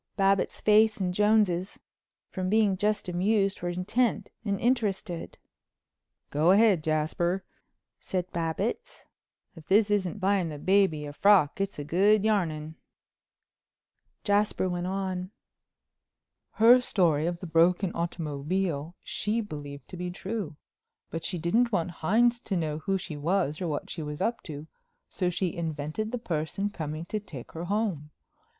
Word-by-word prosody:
Babbitts's 195 -1 +2
face 215 +1 +5
and 185 -3 -1
Jones's, 205 -3 +2 0.5
from 185 -1 -2
being 210 -2 +3
just 210 +2 0
amused, 195 +3 +1
were 175 - -2
intent 210 +7 0
and 200 -3 -1
interested. 215 -8 -1 0.9
"Go 155 +4 +2
ahead, 200 -4 +5
Jasper," 160 +4 0 0.6
said 185 -2 -2
Babbitts, 170 - -3 0.5
"if 160 -2 -13
this 210 +2 +4
isn't 205 0 0
buying 195 -3 +1
the 150 - -6
baby 185 -3 +2
a 145 - -7
frock 195 -2 +4
it's 195 0 -2
good 195 +8 +3
yarning." 160 -8 0 1.5
Jasper 205 -2 +1
went 175 0 -2
on. 185 -1 -3 1.2
"Her 235 +3 +7
story 165 -9 +2
of 175 0 -3
the 185 - -7
broken 175 +3 +3
automobile 165 0 -2
she 215 +3 -2
believed 145 -9 -7
to 180 - -8
be 180 +1 -3
true. 190 -2 -5 0.6
But 165 -1 -4
she 180 - -3
didn't 225 +9 +2
want 180 -3 0
Hines 235 +9 +2
to 195 -5 -3
know 155 -2 -2
who 195 +3 0
she 170 -5 -7
was 160 0 0
or 180 - -1
what 150 -2 -3
she 165 - -5
was 150 -1 -5
up 230 +5 -1
to, 150 -1 -7 0.4
so 180 -2 -1
she 180 0 -1
invented 160 +6 -3
the 250 - -2
person 180 0 -2
coming 155 -2 -5
to 215 +4 -3
take 150 - -10
her 165 +2 -6
home. 190 -7 -1
185 Hz, 145 wpm, -28 LUFS, 160-205 Hz, 1.5 s, Her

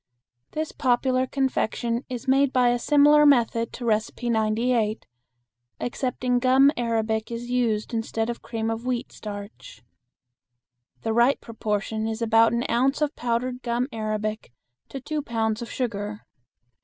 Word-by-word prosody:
This 310 0 -3
popular 255 0 +1
confection 245 -3 -1
is 250 -1 -6
made 270 +1 +4
by 250 -2 +3
a 240 0 +1
similar 295 +3 +5
method 235 -5 +3
to 250 - -7
No. 230 +2 0 0.2
98, 225 -1 0 0.7
excepting 250 0 -1
gum 265 +2 +5
arabic 220 -2 -1
is 240 +1 -5
used 235 -3 0
instead 225 0 -1
of 235 0 -4
cream 225 -1 -3
of 225 +1 -4
wheat 250 -1 -2
starch. 205 - -9 1.2
The 225 - 0
right 240 +4 +4
proportion 220 -1 -3
is 220 0 -3
about 225 0 +4
an 235 +1 0
ounce 265 +5 +1
of 300 0 -1
powdered 245 +1 -2
gum 240 +1 -1
arabic 215 - -3 0.4
to 270 - -6
two 300 +3 -3
pounds 225 -3 -1
of 235 - -6
sugar. 210 -4 -4
235 Hz, 140 wpm, -25 LUFS, 220-255 Hz, 1.2 s, similar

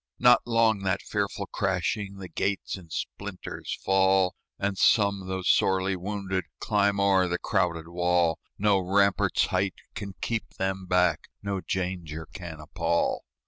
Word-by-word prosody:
Not 125 0 +6
long 115 -2 +3
that 95 -1 -1
fearful - - -2
crashing, 100 +1 -1
The 95 -1 -7
gates 100 +2 -2
in 90 -4 -12
splinters 100 +3 -5
fall; 95 -1 +4 0.2
And 100 0 -1
some, 100 -1 +3
though 95 0 -3
sorely 95 +1 +3
wounded, 95 -1 -3
Climb 100 -2 +2
o'er 95 -2 +4
the 90 0 -1
crowded 85 -3 0
wall: 85 -1 +1 0.2
No 100 -1 +3
rampart's 100 +2 +2
height 95 +1 0 0.2
can 100 -3 -6
keep 115 -1 -3
them 95 0 -2
back, 90 -3 +2 0.2
No 100 -2 -2
danger 90 -4 -3
can 85 -4 -7
appall. 85 +2 -1
95 Hz, 140 wpm, -27 LUFS, 90-100 Hz, 0.2 s, Not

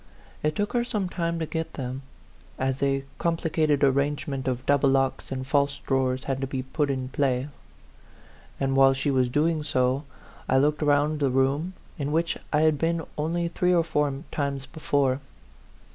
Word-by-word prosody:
It 150 0 0
took 205 0 -1
her 240 -1 +2
some 210 -6 -2
time 170 -2 -1
to 165 - -1
get 160 +1 -4
them, 130 0 -4 0.6
as 130 0 -1
a 135 -1 +1 0.2
complicated 160 -3 +1
arrangement 140 0 +1
of 125 -1 -2
double 140 -1 +4
locks 135 0 0
and 130 -1 -3
false 140 0 +1
draw 130 -1 +1
ers 130 +1 -3
had 135 -1 -2
to 135 - -1
be 130 -1 -3
put 145 +2 -1
in 130 -2 -2
play; 130 0 0 1.1
and, 135 -1 0
while 135 0 +6
she 140 +2 0
was 130 -2 +2
doing 155 +4 +1
so, 130 -1 +1 0.5
I 130 - +4
looked 150 +3 +2
round 150 +1 +2
the 140 -2 +2
room, 135 +7 +1 0.3
in 145 0 -2
which 165 +1 +1 0.2
I 150 - +3
had 155 -2 +3
been 165 0 0
only 170 +3 -1
three 180 +1 +1
or 170 - +4
four 150 -3 +1 0.2
times 140 -2 -2
before. 140 -4 0
140 Hz, 175 wpm, -26 LUFS, 135-160 Hz, 1.1 s, while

